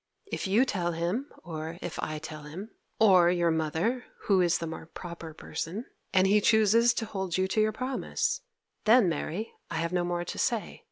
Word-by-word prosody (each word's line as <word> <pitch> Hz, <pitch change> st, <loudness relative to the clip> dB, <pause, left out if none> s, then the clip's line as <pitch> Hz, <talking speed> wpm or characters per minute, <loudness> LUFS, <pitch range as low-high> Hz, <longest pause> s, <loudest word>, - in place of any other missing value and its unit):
If -, -, -2 dB
you 215 Hz, +7 st, +4 dB
tell 175 Hz, -8 st, -1 dB
him, 180 Hz, -, -2 dB
or 160 Hz, 0 st, -5 dB
if 175 Hz, -, -5 dB
I 155 Hz, -, -3 dB
tell 155 Hz, 0 st, -7 dB
him, 175 Hz, +9 st, -8 dB, 0.3 s
or 185 Hz, -5 st, +6 dB
your 175 Hz, -1 st, +2 dB
mother, 160 Hz, +10 st, 0 dB, 0.2 s
who 195 Hz, -3 st, +3 dB
is 175 Hz, -1 st, +3 dB
the 170 Hz, -, -4 dB
more 160 Hz, 0 st, -7 dB
proper 170 Hz, -1 st, -8 dB
person, 185 Hz, +8 st, -5 dB, 0.3 s
and 190 Hz, -1 st, +4 dB
he 205 Hz, +2 st, +4 dB
chooses 220 Hz, +2 st, +5 dB
to 225 Hz, -, -1 dB
hold 190 Hz, -4 st, -3 dB
you 185 Hz, 0 st, +2 dB
to 215 Hz, -, +2 dB
your 215 Hz, 0 st, +3 dB
promise, 440 Hz, -, -1 dB, 0.4 s
then, 225 Hz, -1 st, +6 dB
Mary, 175 Hz, +5 st, -3 dB, 0.2 s
I -, -, -4 dB
have 170 Hz, +2 st, -1 dB
no 180 Hz, -1 st, +2 dB
more 175 Hz, 0 st, -2 dB
to -, -, -5 dB
say. 235 Hz, -5 st, -1 dB
185 Hz, 190 wpm, -29 LUFS, 170-220 Hz, 0.4 s, or